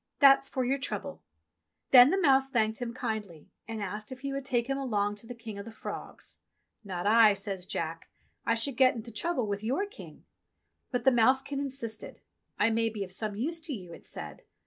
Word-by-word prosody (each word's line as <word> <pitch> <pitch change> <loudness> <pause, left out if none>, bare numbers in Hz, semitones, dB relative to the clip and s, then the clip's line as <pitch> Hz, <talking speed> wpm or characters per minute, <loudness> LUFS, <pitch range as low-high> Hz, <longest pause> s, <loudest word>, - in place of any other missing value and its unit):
"That's 275 -1 +6
for 260 -1 -1
your 270 +3 0
trouble - - -4 0.3
!" - - -53
Then 250 0 +10
the 385 - +2
mouse 270 -5 +4
thanked 220 -2 0
him 240 -1 -2
kindly 215 -9 -5 0.2
and 225 -2 -4
asked 210 +4 -4
if 260 -1 -8
he 275 0 -3
would 275 -1 -4
take 240 -3 +1
him 270 +1 -2
along 205 -6 -1
to 225 - -10
the 245 - -7
King 225 -3 -8
of 200 - -7
the 230 - -8
Frogs. 220 - -8 0.4
"Not 185 -3 -5
I," 215 -1 +6
says 195 -2 -4
Jack. 165 +1 -4 0.3
"I 230 - +2
should 240 +2 0
get 260 -1 +5
into 230 0 -7
trouble 255 +3 -1
with 205 0 -3
your 265 - 0
King." 410 +4 -13 0.6
But 245 -2 -2
the 265 - +6
mousekin 265 +4 +3
insisted. 260 -5 -5 0.4
"I 210 +2 +3
may 225 0 +1
be 210 -2 -4
of 185 - -9
some 210 +2 -2
use 320 +10 -2
to 315 -2 -4
you," 180 -5 -9
it - - -13
said. - - -8
230 Hz, 210 wpm, -29 LUFS, 210-270 Hz, 0.6 s, Then